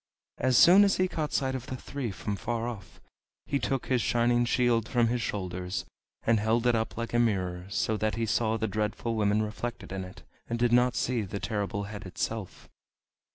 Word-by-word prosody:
As 130 -1 +3
soon 190 +4 +8
as 200 -1 +3
he 185 - +2
caught 155 -4 -3
sight 130 -1 0
of 130 -1 -5
the 130 - -4
three 135 -1 -4
from 100 +1 -4
far 115 +3 -2
off 105 -6 -8 0.5
he 140 - 0
took 135 -2 -1
his 125 -2 +1
shining 120 0 +2
shield 120 -2 +2
from 120 -2 +3
his 120 0 0
shoulders, 90 -3 -3 0.4
and 115 -1 +3
held 115 +3 +1
it 120 - +4
up 110 -1 -1
like 115 0 -4
a 120 - +3
mirror, 90 -6 0
so 110 +1 0
that 110 0 0
he 115 0 -1
saw 110 0 +1
the 110 0 -1
Dreadful 110 +2 -2
Women 105 -1 +2
reflected 110 -1 -5
in 95 -1 -3
it, 90 0 -11 0.3
and 115 - -1
did 120 0 +2
not 125 0 +4
see 125 -2 0
the 100 0 -5
Terrible 100 -2 -2
Head 105 -1 -7
itself. 105 +2 -4
115 Hz, 200 wpm, -29 LUFS, 105-120 Hz, 0.5 s, soon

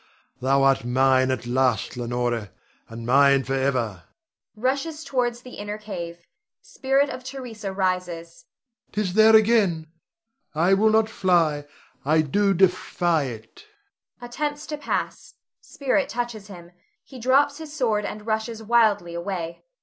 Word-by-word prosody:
Thou 135 +1 +2
art 135 -3 +3
mine 130 +1 +3
at 130 -2 -2
last, 125 -1 0
Leonore, 120 -3 -2 0.4
and 115 0 -8
mine 140 +2 +5
forever! 130 -8 -1 0.5
[Rushes 275 +7 -2
towards 245 -4 -1
the 250 - -11
inner 205 +1 -5
cave. 170 -5 -7 0.3
Spirit 275 +2 0
of 255 - -7
Theresa 245 -6 -7
rises.] 180 -3 -3 0.5
There 210 - 0 0.3
'tis 220 - +9
again! 195 -8 +1 0.6
I 175 +5 +3
will 210 +3 +4
not 220 0 +3
fly, 165 -8 +1 0.4
I 155 +3 +3
do 195 +6 +1
defy 175 -3 +2
it! 120 - -10 0.5
[_Attempts 290 +5 -4
to 300 - -3
pass. 295 - -4 0.2
Spirit 280 0 -1
touches 235 -4 -4
him; 175 -4 -12 0.3
he 260 - -12
drops 280 +4 +2
his 315 -2 -8
sword 230 -8 0
and 210 +1 -6
rushes 220 0 -3
wildly 210 -6 +2
away. 170 -1 -5
195 Hz, 130 wpm, -24 LUFS, -, 0.6 s, tis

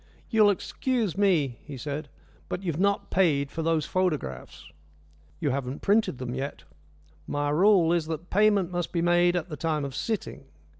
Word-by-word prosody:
"You'll 215 -3 +5
excuse 220 +1 -1
me," 165 - +2
he 140 -2 -8
said, 145 +3 -5 0.4
"but 185 - -4
you've 165 -4 -2
not 200 +1 +1
paid 145 -7 +2
for 165 - -4
those 160 -1 +1
photographs." 150 - -3 0.7
"You 145 - 0
haven't 135 0 -4
printed 210 - +2
them 125 -1 -5
yet." 135 +2 -5 0.6
"My 145 0 -1
rule 175 0 +4
is 165 -3 0
that 165 +2 -5
payment 205 -3 +3
must 175 -2 -2
be 170 -1 0
made 175 0 +3
at 175 0 -2
the 150 - -6
time 155 -3 -1
of 135 - -6
sitting." 215 - -4
165 Hz, 165 wpm, -27 LUFS, 145-190 Hz, 0.7 s, You'll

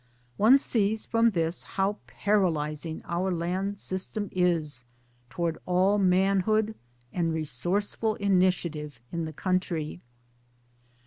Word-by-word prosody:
One 235 +6 +7
sees 220 -5 0
from 230 0 +3
this 165 -4 -1
how 195 +1 -1
paralysing 160 - 0
our 180 +2 -1
land 185 +4 -2
system 190 +2 -3
is 165 -8 0 0.5
towards 170 +1 -2
all 185 +3 +3
manhood 195 +3 +3 0.4
and 170 -2 0
resourceful 175 - -1
initiative 180 - +1
in 170 -1 -2
the 155 - -6
country. 175 -2 -2
185 Hz, 105 wpm, -28 LUFS, 165-200 Hz, 0.5 s, One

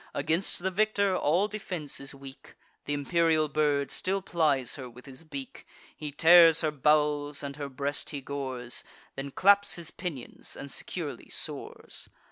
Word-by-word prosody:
Against 170 +3 0
the 190 - 0
victor, 200 -1 +2
all 180 +5 +2
defence 185 -8 -5
is 140 0 -6
weak: 135 0 -12 0.3
Th' - - -11
imperial 155 +2 +2
bird 145 -1 +1
still 195 +1 -1
plies 150 -8 +1
her 130 -3 -7
with 125 +1 -15
his 135 +3 -12
beak; 265 - -8 0.3
He 150 -1 -6
tears 165 +2 +7
her 155 -2 +1
bowels, 150 0 +2
and 140 0 -5
her 145 -1 -5
breast 140 +2 -3
he 145 - -4
gores; 130 -3 -4 0.3
Then 135 +1 -4
claps 200 +6 +4
his 170 -2 -4
pinions, 160 -10 -6
and - - -7
securely - - -5
soars. - - -5
150 Hz, 155 wpm, -29 LUFS, 140-175 Hz, 0.3 s, tears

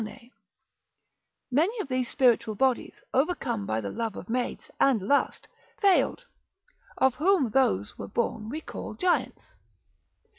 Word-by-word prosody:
Many 345 - +2
of 405 - -3
those 255 -2 -1
spiritual 235 -5 +2
bodies, 260 +2 0
overcome 260 - 0
by 110 +1 -1
the 100 - -4
love 225 -3 -3
of 195 - -8
maids, 245 0 -3
and 270 -5 +4
lust, 280 +9 0 0.3
failed, 405 +5 +3 0.7
of 265 -1 +4
whom 305 - +2
those 105 - +1
were - - -5
born 220 0 -2
we 305 +6 -4
call - - -7
giants. 365 -1 -1
255 Hz, 125 wpm, -27 LUFS, 225-305 Hz, 0.7 s, and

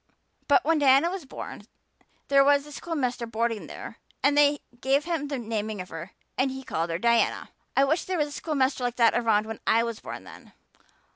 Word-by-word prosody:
But 370 - +4
when 325 0 +3
Diana 280 +4 +5
was 375 -5 -5
born - - -8 0.6
there 275 0 +5
was 285 0 +4
a 295 - -12
schoolmaster 260 -7 -3
boarding 230 -1 -2
there - - -9 0.3
and 285 +1 +4
they 290 0 +4 0.2
gave 270 +4 +2
him 330 -4 -2
the 280 -1 -3
naming 220 -3 -3
of 180 - -6
her 165 +4 -8 0.3
and 265 +1 +3
he 265 0 -6
called 165 -7 -2
her 165 - -1
Diana." 235 +4 +1 0.3
"I 275 - +6
wish 310 +5 +1
there 370 -1 -2
had 305 - +3
been 295 - -5
a - - -12
schoolmaster 270 -4 -1
like 245 -1 -1
that 230 -2 +4
around 220 -3 +2
when 220 0 -6
I 230 +1 +4
was 230 -2 -4
born, - - -8
then. - - -14
265 Hz, 210 wpm, -26 LUFS, 230-290 Hz, 0.6 s, I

